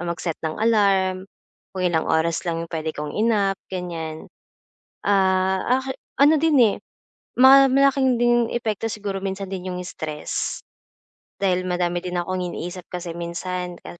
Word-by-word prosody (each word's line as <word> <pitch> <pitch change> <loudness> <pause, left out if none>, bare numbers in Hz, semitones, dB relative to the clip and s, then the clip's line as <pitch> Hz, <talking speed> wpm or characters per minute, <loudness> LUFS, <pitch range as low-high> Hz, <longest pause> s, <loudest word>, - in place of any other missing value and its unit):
mag-set 170 -1 -3
ng 155 - -2
alarm 195 -4 +2 0.5
kung 185 -1 -4
ilang 165 -2 +1
oras 160 +1 +1
lang 165 -1 -2
'yong 170 - -15
puwede 160 -1 -2
kong 150 0 -4
i-nap, 210 -3 +2 0.2
ganiyan. 165 -3 -5 0.8
Ah, 190 +4 +2
aki 265 0 -4 0.3
ano 300 +3 +6
din, 310 -1 +2
eh, 220 -4 +4 0.6
ma 270 +1 +8
malaking 270 -2 +3
din 240 -1 +3
epekto 225 -2 -2
siguro 200 -3 -4
minsan 195 0 -3
din 185 -1 -5
'yong 180 - -4
stress 155 -1 -4 0.8
dahil 185 -1 +1
madami 175 -1 0
din 180 0 -5
akong 185 +1 -2
iniisip 180 0 -5
kasi 175 -1 -6
minsan 175 +1 -4
ka 175 - -10
185 Hz, 145 wpm, -23 LUFS, 175-220 Hz, 0.8 s, ma